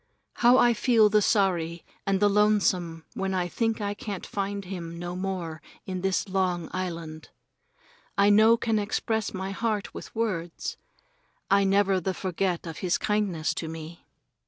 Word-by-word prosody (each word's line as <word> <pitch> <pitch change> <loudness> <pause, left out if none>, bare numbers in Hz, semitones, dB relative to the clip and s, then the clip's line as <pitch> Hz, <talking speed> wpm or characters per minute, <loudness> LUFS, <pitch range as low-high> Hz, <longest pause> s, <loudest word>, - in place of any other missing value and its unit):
How 245 +1 +6
I 240 -2 +5
feel 225 -2 +4
the 210 0 +4
sorry 175 -5 +1 0.2
and 195 -1 +2
the 205 - +5
lonesome 190 -6 +2
when 190 0 -2
I 180 -1 0
think 225 +5 -1
I 205 0 -1
can't 205 -2 -6
find 200 0 -3
him 170 -3 -6
no 175 +1 -5
more 180 -4 -4 0.2
in 185 -1 -4
this 190 +2 0
long 185 -3 -1
island. 165 -4 -5 0.9
I 200 +1 +5
no 220 +3 +6
can 225 -2 0
express 215 +1 -1
my 190 0 -4
heart 210 0 -2
with - - -9
words. 185 -7 -2 0.8
I 200 0 +5
never 195 -1 +3
the 185 +1 -2
forget 185 -1 -1
of 165 -1 -7
his 180 -2 +1
kindness 200 -7 0
to 165 - -4
me. 160 +1 -8
195 Hz, 160 wpm, -27 LUFS, 175-210 Hz, 0.9 s, How